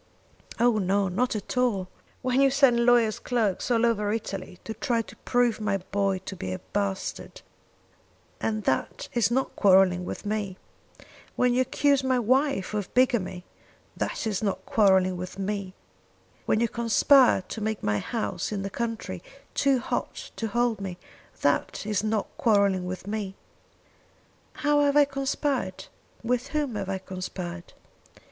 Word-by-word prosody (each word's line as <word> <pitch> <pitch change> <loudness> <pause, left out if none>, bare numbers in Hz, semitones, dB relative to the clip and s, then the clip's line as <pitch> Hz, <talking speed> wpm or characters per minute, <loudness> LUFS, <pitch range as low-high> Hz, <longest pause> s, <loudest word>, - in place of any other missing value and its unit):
"Oh 235 -2 +4
no; 195 0 +1
not 225 +7 0
at 210 - -5
all! 220 -7 +1 0.4
When 255 +1 +2
you 275 - +6
send 255 -3 +4
lawyer's 235 -3 +4
clerks 225 -6 -1
all 235 -1 +3
over 210 -3 +1
Italy 195 -4 -4
to 220 - -5
try 230 0 0
to - - -14
prove 245 -3 +1
my 205 -2 +1
boy 195 +1 -1
to 195 - -5
be 95 - -5
a 95 - -2
bastard, 200 -1 -4 1.0
and 215 -1 -1
that 130 -7 -1
is 235 -2 +2
not 265 +3 -1
quarrelling 190 -2 +5
with 180 - -6
me! 205 -3 -2 0.8
When 250 -1 +3
you 255 - +3
accuse 280 +1 +2
my 260 -1 +2
wife 255 -3 +1
of 205 -3 -3
bigamy 235 -8 +2 0.5
that - - -3
is 210 -4 -1
not 200 -3 -2
quarrelling 190 -3 +3
with 180 +2 -7
me! 195 -1 -3 0.7
When 215 - +3
you 235 - +2
conspire 235 0 +4
to 220 - -7
make 220 0 -2
my 105 0 +1
house 225 - -3
in 200 -2 -2
the 195 - -4
country 230 +1 -4 0.3
too 275 -1 +3
hot 245 - -4
to 225 - -2
hold 240 -1 0
me, 185 -3 -5 0.4
that 145 +7 0
is 210 -2 0
not 215 -1 0
quarrelling 200 -5 +2
with 185 0 -5
me!" 205 -2 -4 1.2
"How 295 0 +2
have 285 0 +3
I 290 - +7
conspired? 275 -6 -2 0.4
with 250 +2 0
whom 295 -5 -1
have 200 -2 -4
I 195 - -1
conspired?" 185 -2 -7
215 Hz, 155 wpm, -26 LUFS, 190-245 Hz, 1.2 s, I